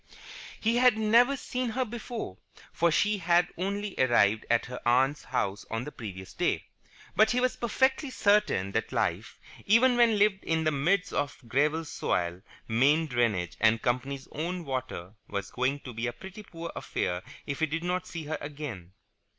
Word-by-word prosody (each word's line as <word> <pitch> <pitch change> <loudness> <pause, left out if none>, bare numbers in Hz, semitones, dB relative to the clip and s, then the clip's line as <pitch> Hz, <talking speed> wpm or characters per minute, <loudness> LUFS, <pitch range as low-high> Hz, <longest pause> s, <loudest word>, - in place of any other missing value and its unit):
He 230 +2 +1
had 250 -3 +5
never 235 +5 +4
seen 255 -1 -3
her 255 +3 -1
before, 230 - -6 0.3
for 170 - +3
she 205 +6 +2
had 175 0 +3
only 200 +2 -3
arrived 110 -4 +3
at 115 0 +3
her 125 0 -7
aunt's 135 +4 +2
house 100 +1 -2
on 115 +1 -2
the 150 - -7
previous 95 -7 -8
day, - - 0 0.5
but 215 +1 +5
he 245 - +2
was 255 0 +1
perfectly 265 +4 +1
certain 205 - +2
that - - -2
life, - - -2 0.3
even 240 +5 +5
when 230 -3 +5
lived 200 -1 +3
in 160 0 0
the 155 - +2
midst 175 +7 +1
of 145 0 -1
gravel 150 +6 +1
soil, 85 - -2 0.3
main 140 +8 +3
drainage, 115 - 0
and 110 0 +3
company's 130 +2 -1
own 170 +3 -3
water, 125 -9 -4
was 100 -2 -4
going 135 +3 -1
to 125 - -8
be 115 +2 -2
a 120 - -3
pretty 190 - -10
poor 170 -4 -8
affair 90 0 -2 0.2
if 140 -1 -4
he 160 - +2
did 165 +2 -3
not 180 +1 -1
see 165 -2 -6
her 155 +1 -4
again. 140 - -7
155 Hz, 175 wpm, -29 LUFS, -, 0.5 s, had